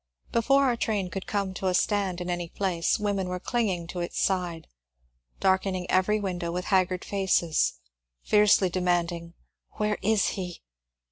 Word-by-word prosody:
Before 275 Hz, +4 st, +3 dB
our 255 Hz, -3 st, +2 dB
train 205 Hz, -5 st, -1 dB
could 195 Hz, -, -5 dB
come 200 Hz, -2 st, -1 dB
to 190 Hz, +1 st, -3 dB
a 180 Hz, -, +2 dB
stand 195 Hz, -3 st, 0 dB
in 175 Hz, -, -4 dB
any 175 Hz, -1 st, -3 dB
place, 180 Hz, -4 st, 0 dB
women 200 Hz, -3 st, -1 dB
were 180 Hz, 0 st, -3 dB
clinging 195 Hz, -7 st, -1 dB
to 180 Hz, -, -5 dB
its 175 Hz, -, -3 dB
side, 180 Hz, -4 st, -1 dB, 0.7 s
darken 190 Hz, 0 st, +2 dB
ing 180 Hz, -1 st, -3 dB
every 190 Hz, +3 st, +3 dB
window 180 Hz, -4 st, -3 dB
with 180 Hz, +1 st, -3 dB
haggard 185 Hz, -1 st, +2 dB
faces, 190 Hz, -5 st, +1 dB, 0.5 s
fiercely 210 Hz, -3 st, +4 dB
demanding, 175 Hz, -1 st, -1 dB, 0.4 s
Where 210 Hz, 0 st, -1 dB
is 215 Hz, 0 st, +2 dB
he 180 Hz, -3 st, -6 dB
185 Hz, 155 wpm, -27 LUFS, 175-205 Hz, 0.7 s, fiercely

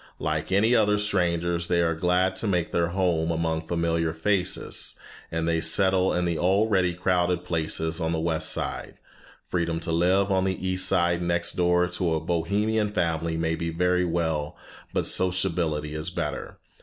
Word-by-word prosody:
Like 75 Hz, +3 st, -2 dB
any 105 Hz, +5 st, +3 dB
other 105 Hz, -3 st, +3 dB
strangers 85 Hz, -4 st, 0 dB
they 90 Hz, -1 st, +2 dB
are 85 Hz, -1 st, +2 dB
glad 90 Hz, +3 st, +1 dB
to 110 Hz, -, -1 dB
make 90 Hz, -4 st, 0 dB
their 85 Hz, 0 st, +1 dB
home 85 Hz, -3 st, 0 dB
among 80 Hz, -1 st, -1 dB
familiar 85 Hz, -1 st, 0 dB
faces, 90 Hz, +2 st, -1 dB, 0.3 s
and 80 Hz, 0 st, -1 dB
they 85 Hz, 0 st, +1 dB
settle 95 Hz, 0 st, +2 dB
in 90 Hz, 0 st, 0 dB
the 85 Hz, -2 st, -1 dB
already 95 Hz, -1 st, +2 dB
crowded 90 Hz, 0 st, 0 dB
places 80 Hz, 0 st, -2 dB
on 80 Hz, 0 st, 0 dB
the 80 Hz, -, -1 dB
West 80 Hz, -1 st, -1 dB
Side. -, -, -4 dB, 0.5 s
Freedom 85 Hz, -2 st, -1 dB
to 85 Hz, 0 st, -3 dB
live 95 Hz, +4 st, +2 dB
on 95 Hz, -1 st, +2 dB
the 95 Hz, 0 st, -2 dB
East 95 Hz, 0 st, 0 dB
Side 85 Hz, -2 st, +2 dB
next 85 Hz, 0 st, 0 dB
door 90 Hz, 0 st, +2 dB
to 90 Hz, -2 st, -1 dB
a -, -, 0 dB
Bohemian 100 Hz, +6 st, 0 dB
family 85 Hz, -3 st, -1 dB
may 80 Hz, 0 st, 0 dB
be 85 Hz, 0 st, -3 dB
very 90 Hz, +2 st, +1 dB
well, 80 Hz, -4 st, -1 dB, 0.3 s
but -, -, -1 dB
sociability 85 Hz, -5 st, 0 dB
is 75 Hz, +2 st, -4 dB
better. 85 Hz, -4 st, -4 dB
85 Hz, 170 wpm, -26 LUFS, 80-95 Hz, 0.5 s, any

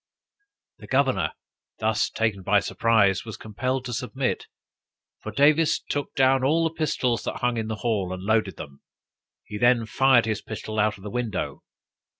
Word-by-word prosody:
The -, -, -12 dB
governor, 130 Hz, -, +1 dB, 0.4 s
thus 110 Hz, -1 st, +1 dB
taken 110 Hz, -4 st, -1 dB
by 100 Hz, +2 st, +3 dB
surprise, 100 Hz, -2 st, +2 dB
was 110 Hz, -2 st, -8 dB
compelled 130 Hz, +4 st, -3 dB
to 125 Hz, -, -4 dB
submit; 130 Hz, +1 st, -2 dB, 0.7 s
for 110 Hz, -, -7 dB
Davis 150 Hz, +7 st, +4 dB
took 145 Hz, -1 st, -4 dB
down 130 Hz, 0 st, +3 dB
all 160 Hz, +5 st, +3 dB
the 165 Hz, 0 st, 0 dB
pistols 130 Hz, -7 st, 0 dB
that -, -, -3 dB
hung 125 Hz, 0 st, +1 dB
in 110 Hz, -1 st, -2 dB
the 110 Hz, -, -3 dB
hall, 100 Hz, -6 st, 0 dB
and 95 Hz, 0 st, -6 dB
loaded 105 Hz, -4 st, +1 dB
them. 70 Hz, -1 st, -10 dB, 0.6 s
He 105 Hz, -, -7 dB
then 120 Hz, -1 st, +4 dB
fired 130 Hz, +1 st, +4 dB
his 110 Hz, -1 st, -2 dB
pistol 110 Hz, 0 st, -5 dB
out 105 Hz, -1 st, +1 dB
of 95 Hz, -, -16 dB
the 105 Hz, -, -6 dB
window. 120 Hz, -5 st, -3 dB
115 Hz, 165 wpm, -25 LUFS, 105-130 Hz, 0.7 s, Davis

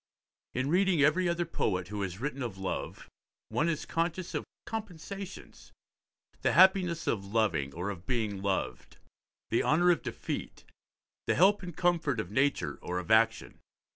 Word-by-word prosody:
In 130 Hz, +2 st, 0 dB
reading 180 Hz, -4 st, +3 dB
every 170 Hz, +5 st, +3 dB
other 170 Hz, 0 st, 0 dB
poet 90 Hz, -, -1 dB
who 105 Hz, 0 st, -4 dB
has 95 Hz, -1 st, -4 dB
written 140 Hz, +1 st, -3 dB
of 115 Hz, -6 st, -4 dB
love 95 Hz, -1 st, -4 dB, 0.4 s
one 165 Hz, +3 st, +1 dB
is 155 Hz, -3 st, -2 dB
conscious 170 Hz, +2 st, -2 dB
of -, -, -2 dB, 0.2 s
compensations: 200 Hz, -2 st, -7 dB, 0.7 s
the -, -, +2 dB
happiness 185 Hz, -3 st, +5 dB
of 100 Hz, -4 st, 0 dB
loving 100 Hz, -9 st, 0 dB
or 90 Hz, +4 st, -2 dB
of 90 Hz, -2 st, -10 dB
being 110 Hz, -6 st, -1 dB
loved, 95 Hz, -11 st, -2 dB, 0.5 s
the 115 Hz, -, +3 dB
honour 175 Hz, +4 st, +4 dB
of 170 Hz, -, +1 dB
defeat, -, -, -5 dB, 0.6 s
the -, -, +2 dB
help 200 Hz, +4 st, +5 dB
and 175 Hz, -4 st, -8 dB
comfort 165 Hz, -8 st, +1 dB
of 100 Hz, -3 st, -4 dB
nature 140 Hz, +5 st, +1 dB
or 90 Hz, -, -3 dB
of 90 Hz, +3 st, -4 dB
action. 110 Hz, 0 st, +3 dB
140 Hz, 155 wpm, -30 LUFS, -, 0.7 s, happiness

